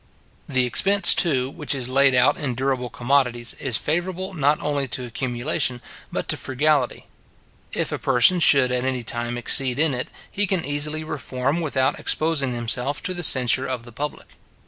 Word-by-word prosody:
The 130 -2 +2
expense, 195 - +5
too, 135 -7 +1
which 150 -1 -2
is 130 -3 -2
laid 135 0 +3
out 125 +4 +4
in 130 -4 -4
durable 130 -1 -2
commodities, 120 -2 0
is 125 -5 +1
favourable 185 +4 -3
not 150 -2 +1
only 145 -2 -2
to 125 +2 -4
accumulation, 125 +1 -2 0.3
but - - -4
to - - +1
frugality. 135 0 -1 0.7
If - - -1
a - - -3
person 135 +8 +3
should 135 -6 +5
at 125 0 -1
any 130 -2 -2
time 120 +1 -3
exceed 125 +1 +2
in 155 -1 +1
it, 125 0 -4 0.2
he 205 0 -1
can 185 -2 -1
easily 150 +2 -1
reform 140 +1 -3
without 130 -4 -1
exposing 150 -6 0
himself 125 +4 -2
to 185 - -3
the 175 - -5
censure 130 -3 +4
of 125 -3 -4
the 120 - -13
public. 145 +4 -6
135 Hz, 170 wpm, -22 LUFS, 125-150 Hz, 0.7 s, expense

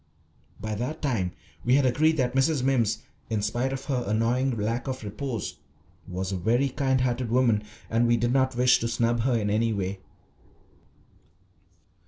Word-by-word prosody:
By 110 0 -4
that 125 +9 -3
time 110 -11 0 0.3
we 125 +2 +4
had 140 -1 +4
agreed 155 +6 +3
that 125 -3 +1
Mrs. 135 +1 +2
Mimms, 120 -5 +1 0.3
in 110 -2 -1
spite 120 +5 0
of 135 0 -5
her 130 -4 -1
annoying 115 +4 +1
lack 115 +4 -2
of 130 -2 -4
repose, 115 +2 -4 0.5
was 95 +1 -3
a 95 - -1
very 120 +9 +2
kind 130 0 +1
hearted 125 -1 0
woman, 120 -3 +3 0.3
and 115 +1 +2
we 120 0 +4
did 120 +2 +1
not 130 -1 +2
wish 125 +1 +4
to 115 - -1
snub 115 0 +1
her 120 +1 +2
in 105 -2 -1
any 115 +2 +2
way. 95 -1 -3
120 Hz, 170 wpm, -26 LUFS, 110-130 Hz, 0.5 s, we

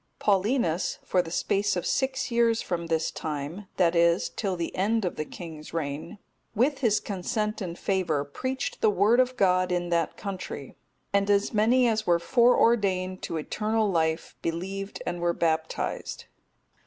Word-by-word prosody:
Paulinus, 200 -3 +1
for 185 - +2
the 165 - -8
space 200 +4 0
of 175 - -2
six 265 -1 0
years 235 -1 +3
from 170 -5 -3
this 160 -1 0
time, 155 +6 -5
that 175 -2 +3
is, 170 +1 +3
till 195 -4 -2
the 170 -1 -4
end 215 +3 +1
of 180 - -2
the 155 - -3
king's 160 -1 -9
reign, 155 +5 -4 0.4
with 265 +5 +2
his 225 -6 +3
consent 210 +2 -2
and 175 -2 -4
favour, 175 -7 0
preached 260 - -4
the 220 - +5
Word 210 +4 +3
of 255 0 +2
God 185 -1 +3
in 175 -1 -1
that 170 -2 0
country, 185 -8 -6 0.4
and 200 0 +2
as 200 +2 +2
many 240 +4 +4
as 220 -1 0
were 170 -1 +5
foreordained 195 -3 +3
to 165 - -3
eternal 215 +6 0
life 160 -1 0
believed 190 +4 -4
and 175 0 -3
were 175 0 +2
baptized. 160 -1 -2
185 Hz, 160 wpm, -27 LUFS, 170-215 Hz, 0.4 s, the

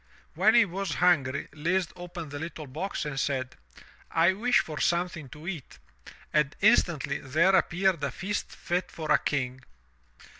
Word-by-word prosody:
When 205 +7 +4
he 235 -2 +7
was 195 -1 -3
hungry, 155 -7 +2
Lise 175 +4 0
opened 175 -3 -8
the 145 - -5
little 160 -1 -6
box 155 +7 -4
and 135 -2 -3
said: 130 -2 -2 0.5
"I 170 +3 +4
wish 245 +5 +3
for 155 -2 -6
something 170 -4 0
to 150 +5 -11
eat," 170 -8 -6 0.6
and 150 -2 +2
instantly 170 - +3
there 160 +8 +2
appeared 180 -2 +2
a 140 - +1
feast 200 +3 -4
fit 180 0 -2
for 155 -2 -4
a - - +6
king. 130 -3 -2
170 Hz, 155 wpm, -28 LUFS, 145-185 Hz, 0.6 s, he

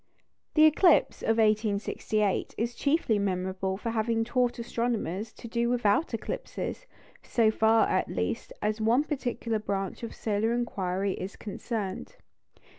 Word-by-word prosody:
The 310 0 +7
eclipse 315 +2 +4
of 225 0 +1
1868 215 -1 +1
is 235 +2 -1
chiefly 280 -5 +1
memorable 190 0 -1
for 230 +3 -3
having 225 0 +1
taught 245 +1 0
astronomers 230 -4 -2
to 235 - -10
do 235 +1 0
without 240 +4 +2
eclipses, - - -5 0.3
so 225 -2 +2
far, 220 +1 +4
at - - 0
least, - - -3
as 215 +1 0
one 235 +6 +3
particular 245 -6 -2
branch 195 -2 -3
of 230 - -6
solar 220 +1 0
inquiry 195 -5 -1
is 190 +2 -6
concerned. 205 -2 -5
225 Hz, 130 wpm, -28 LUFS, 205-240 Hz, 0.3 s, The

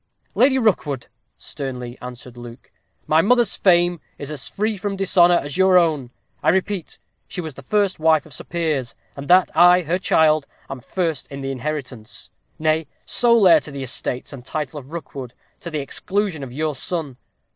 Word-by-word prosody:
"Lady 265 0 +4
Rookwood," 160 - 0 0.3
sternly 125 -4 -6
answered 125 0 -9
Luke, 120 +1 -12 0.3
"my 155 +1 +4
mother's 240 +2 +3
fame 175 -2 +3 0.2
is 145 +1 -7
as 140 -3 -5
free 215 +2 -1
from 200 0 -3
dishonor 180 -2 +4
as 145 +4 -5
your 190 -1 +5
own. 155 -8 +2 0.3
I - - +2
repeat, 190 +1 -1 0.3
she - - -6
was 160 -4 -5
the 140 - -11
first 200 +5 0
wife 160 -1 +3
of 155 - -13
Sir - - -8
Piers; 155 -9 -2 0.2
and 140 0 -8
that 180 +1 +5
I, 175 +2 +6
her 170 +4 -1
child, 155 -4 +3 0.2
am 135 - -5
first 165 +2 -2
in 140 0 -8
the 135 0 -3
inheritance; 130 -4 -6 0.3
nay, 155 0 0 0.2
sole 235 -5 +4
heir 170 - +7
to - - -9
the 140 -1 -6
estates 130 +1 -2
and 130 -3 -9
title 150 +1 -4
of 135 +1 -15
Rookwood, 135 -7 -7 0.2
to 170 - -7
the 155 -3 -3
exclusion 190 +4 -2
of 135 -3 -7
your 155 +3 -2
son. 145 -2 -4
155 Hz, 180 wpm, -21 LUFS, 135-180 Hz, 0.3 s, heir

